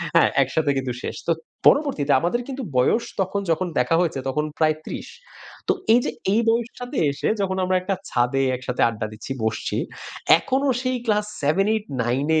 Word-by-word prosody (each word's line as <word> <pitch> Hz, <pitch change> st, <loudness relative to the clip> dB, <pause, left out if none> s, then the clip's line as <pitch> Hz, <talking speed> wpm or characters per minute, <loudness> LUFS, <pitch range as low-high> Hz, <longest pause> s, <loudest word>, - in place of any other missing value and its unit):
হ্যাঁ, -, -, +6 dB
একসাথে 155 Hz, -3 st, 0 dB
কিন্তু 130 Hz, -1 st, -2 dB
শেষ। -, -, -4 dB
তো -, -, +5 dB, 0.4 s
পরবর্তীতে 270 Hz, -, +3 dB
আমাদের 180 Hz, +9 st, 0 dB
কিন্তু 270 Hz, -1 st, -5 dB
বয়স 175 Hz, -, +3 dB, 0.2 s
তখন 190 Hz, +2 st, -1 dB
যখন 180 Hz, +3 st, 0 dB
দেখা 125 Hz, +6 st, +2 dB
হয়েছে 165 Hz, -6 st, 0 dB
তখন 150 Hz, +3 st, 0 dB
প্রায় 155 Hz, -1 st, +3 dB
৩০। -, -, -6 dB, 0.6 s
তো 390 Hz, -, +4 dB, 0.2 s
এই 240 Hz, -, +6 dB
যে -, -, -1 dB, 0.2 s
এই 225 Hz, -, +4 dB
বয়সটাতে 240 Hz, +3 st, -2 dB
এসে 140 Hz, -, -3 dB
যখন 190 Hz, -1 st, -1 dB
আমরা 185 Hz, 0 st, +1 dB
একটা 195 Hz, +1 st, -1 dB
ছাদে 130 Hz, +3 st, +1 dB
একসাথে 125 Hz, 0 st, -3 dB
আড্ডা 110 Hz, -1 st, -4 dB
দিচ্ছি, 110 Hz, +5 st, -9 dB
বসছি, 110 Hz, 0 st, -1 dB, 0.6 s
এখনো 270 Hz, +8 st, 0 dB
সেই 255 Hz, -1 st, 0 dB
ক্লাস 210 Hz, -1 st, +2 dB, 0.2 s
7-8-9 145 Hz, -, +1 dB
175 Hz, 165 wpm, -23 LUFS, 135-225 Hz, 0.6 s, হ্যাঁ